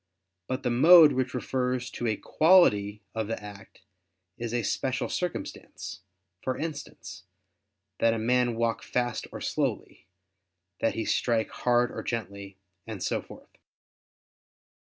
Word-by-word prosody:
But 130 +1 -3
the 125 - 0
mode 155 +5 +8
which 130 -1 -1
refers 125 0 -2
to 120 - -3
a 110 - +1
quality 105 - +3
of 110 -2 -2
the 115 - -3
act 100 -2 -12 0.5
is 120 -1 -5
a 120 -1 -1
special 130 +5 -1
circumstance; 180 - -5 0.4
for 130 - -2
instance, 150 -10 -7 0.7
that 115 - +4
a - - -2
man 120 +1 +1
walk 115 0 0
fast 120 -2 -2
or - - -8
slowly; - - -3 0.7
that 115 - 0
he 115 - -2
strike 115 -2 0
hard 120 0 +1
or - - -5
gently, 100 -4 -5 0.3
and - - -6
so - - -1
forth. - - -15
120 Hz, 135 wpm, -28 LUFS, 110-130 Hz, 0.7 s, mode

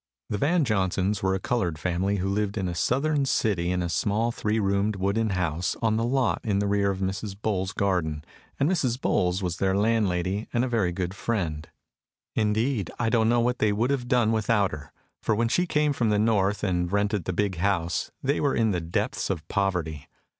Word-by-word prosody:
The 105 - -1
Van 160 - +2
Johnsons 95 -2 0
were 95 0 +1
a - - -2
colored 95 -7 -1
family 90 +5 0
who 95 -1 -1
lived 100 +1 -1
in 95 -2 -1
a 90 - -2
Southern 140 - +1
city 100 -9 +1
in 90 -1 0
a - - -1
small 105 +8 0
three 110 -1 -1
roomed 100 +1 +1
wooden 100 +4 0
house 90 -3 -1
on 110 -2 +1
the 115 - 0
lot 125 0 +1
in 105 -3 0
the 100 - +1
rear 100 0 +2
of 95 -1 -3
Mrs. 95 +1 -3
Bowles's 95 -3 -1
garden, 80 -7 -1 0.3
and 140 - +3
Mrs. 135 -9 0
Bowles 90 -5 +1
was 90 -2 -2
their 95 0 +1
landlady 100 -2 +1
and 120 +2 +1
very 110 -8 +1
good 90 +1 -3
friend. 85 -9 -3 0.6
Indeed, 110 -1 0
I 115 -2 +1
don't 115 -1 +3
know 120 0 +3
what 125 +1 0
they 105 - +3
would 115 +6 +1
have 130 -3 -1
done 120 -3 +3
without 110 -2 +2
her, 75 -1 -8 0.3
for 110 - +1
when 115 +2 +1
she 180 +8 +1
came 150 -3 +2
from 120 -5 0
the 105 - +2
North, 105 -2 +1
and 90 -3 0
rented 100 -2 0
the - - -1
big 100 -1 -1
house, 90 -2 0
they 140 +2 +1
were 140 -2 +1
in 110 -2 +2
the 90 -3 -1
depths 80 +1 -2
of 80 -1 -3
poverty. 85 -7 -1
100 Hz, 205 wpm, -26 LUFS, 95-115 Hz, 0.6 s, and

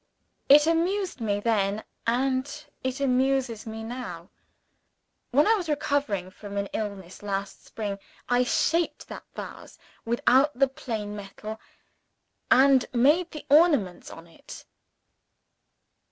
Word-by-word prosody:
It 295 +2 +8
amused 345 0 0
me, 205 -2 0
then 205 -1 0 0.2
and 265 +5 -1 0.2
it 260 +1 -2
amuses 260 -3 +1
me 220 0 -6
now. 220 -7 -7 1.0
When 285 +4 +4
I 445 - +5
was 370 -7 -2
recovering 280 -11 -1
from 200 0 -8
an 200 - 0
illness 200 -4 -5
last 200 -1 -4
spring, 205 -3 -4 0.3
I 245 0 +3
shaped 330 +6 0
that - - -8
vase - - -9 0.5
out 270 +4 +5
of - - -17
the 275 - +5
plain 220 -6 -5
metal, 210 +2 -8 0.9
and 265 0 +6
made 295 +9 +3
the 305 - -9
ornaments 290 - +4
on 165 - -11
it." 165 - -13
245 Hz, 125 wpm, -26 LUFS, 205-285 Hz, 1.0 s, It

